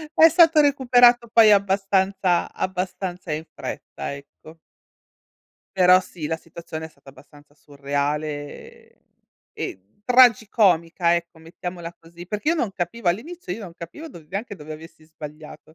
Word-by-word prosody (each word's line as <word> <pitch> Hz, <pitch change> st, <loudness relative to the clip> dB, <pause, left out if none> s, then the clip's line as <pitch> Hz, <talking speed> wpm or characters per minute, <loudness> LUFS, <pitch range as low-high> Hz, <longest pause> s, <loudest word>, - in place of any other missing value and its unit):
È 325 Hz, -, +8 dB
stato 325 Hz, -1 st, +5 dB
recuperato 245 Hz, -4 st, +4 dB
poi 225 Hz, -2 st, +6 dB
abbastanza 195 Hz, -2 st, +1 dB
abbastanza 185 Hz, -1 st, -4 dB
in 155 Hz, +1 st, -4 dB
fretta, -, -, -6 dB
ecco. 145 Hz, +3 st, -15 dB, 1.2 s
Però 185 Hz, 0 st, +6 dB
sì, 170 Hz, -4 st, -8 dB
la 160 Hz, +2 st, -2 dB
situazione 160 Hz, 0 st, -9 dB
è -, -, -14 dB
stata 140 Hz, -3 st, -18 dB
abbastanza 145 Hz, +2 st, -19 dB
surreale, 145 Hz, +1 st, -5 dB
ehm -, -, -43 dB, 0.5 s
e 95 Hz, -, -5 dB, 0.2 s
tragicomica, 200 Hz, -8 st, +4 dB
ecco 170 Hz, -1 st, -7 dB
mettiamola 170 Hz, +1 st, -8 dB
così, 170 Hz, +1 st, -13 dB
perché 210 Hz, -, -2 dB
io -, -, +2 dB
non 240 Hz, -11 st, -2 dB
capivo 195 Hz, +3 st, -3 dB
all'inizio 245 Hz, -, -3 dB
io 210 Hz, -, -6 dB
non 170 Hz, -3 st, -11 dB
capivo 235 Hz, -, -9 dB
dov 170 Hz, -, -13 dB
neanche 205 Hz, +2 st, -5 dB
dove 155 Hz, -4 st, -10 dB
avessi 155 Hz, 0 st, -13 dB
sbagliato. 155 Hz, 0 st, -12 dB
175 Hz, 135 wpm, -23 LUFS, 155-215 Hz, 1.2 s, È